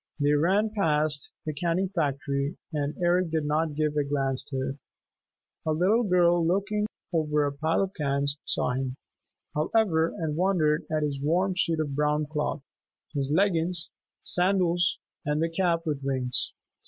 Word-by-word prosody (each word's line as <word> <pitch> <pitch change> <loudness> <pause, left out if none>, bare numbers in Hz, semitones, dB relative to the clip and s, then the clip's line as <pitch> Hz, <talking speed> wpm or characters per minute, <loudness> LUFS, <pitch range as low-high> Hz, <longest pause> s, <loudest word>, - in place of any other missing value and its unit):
They 145 0 +3
ran 190 +9 +3
past 155 -7 0 0.2
the 155 - -2
canning 175 +5 0
factory, 140 -3 -1 0.2
and 145 -1 -1
Eric 175 0 +3
did 160 -2 -1
not 155 0 0
give 150 0 0
a 145 - +2
glance 135 -2 -1
to 135 -2 -3
it. 135 - -6 0.9
A 155 - 0
little 190 +9 +3
girl 175 -4 +3
looking 200 +5 +1
out - - -3 0.3
over 150 -1 +1
a 145 - 0
pile 160 +6 +1
of 195 0 -4
cans 140 -2 -1
saw - - 0
him, 130 0 -2 0.6
however, 165 0 +2
and 155 -3 -2
wondered 165 -4 +2
at 155 -1 +1
his 140 -2 -2
warm 180 +6 +1
suit 165 -3 +1
of 150 -3 -1
brown 150 +1 +1
cloth, 150 -1 -2 0.5
his 140 -2 0
leggins, 170 -1 +2 0.3
sandals 175 -2 +3 0.3
and 150 +1 0
the 165 +1 +1
cap 170 -1 0
with 150 -3 -2
wings. 130 -2 -1
155 Hz, 160 wpm, -27 LUFS, 145-175 Hz, 0.9 s, They